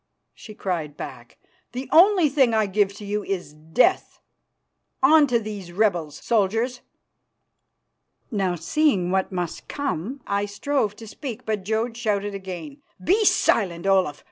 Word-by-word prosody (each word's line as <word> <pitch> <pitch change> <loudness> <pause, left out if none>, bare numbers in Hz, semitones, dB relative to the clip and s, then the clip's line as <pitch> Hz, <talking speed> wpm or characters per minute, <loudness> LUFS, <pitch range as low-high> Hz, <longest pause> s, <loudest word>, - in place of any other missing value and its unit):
she 215 - -12
cried 165 -8 -3
back. 120 -2 -9 0.4
"The 255 +1 -5
only 360 0 +6
thing 265 -5 +3
I 220 -1 +3
give 200 0 +1
to 205 - -9
you 205 +1 -2
is 180 -7 -4
death. 160 - +1 0.8
On 300 +2 +6
to 245 -2 +2
these 205 -5 -7
rebels, 175 -6 0
soldiers!" 230 +3 +1 1.5
Now, 195 -5 0
seeing 185 - +1
what 190 0 0
must 180 -3 -4
come, 270 - -4
I 200 +1 -1
strove 210 0 -1
to 225 +1 -11
speak, 245 +1 -7
but 215 -3 -2
Jodd 225 +3 -1
shouted 205 -3 -1
again, 195 - -7 0.2
"Be 410 +5 +3
silent, 180 - +2
Olaf. 190 -7 +2
210 Hz, 140 wpm, -24 LUFS, 185-250 Hz, 1.5 s, only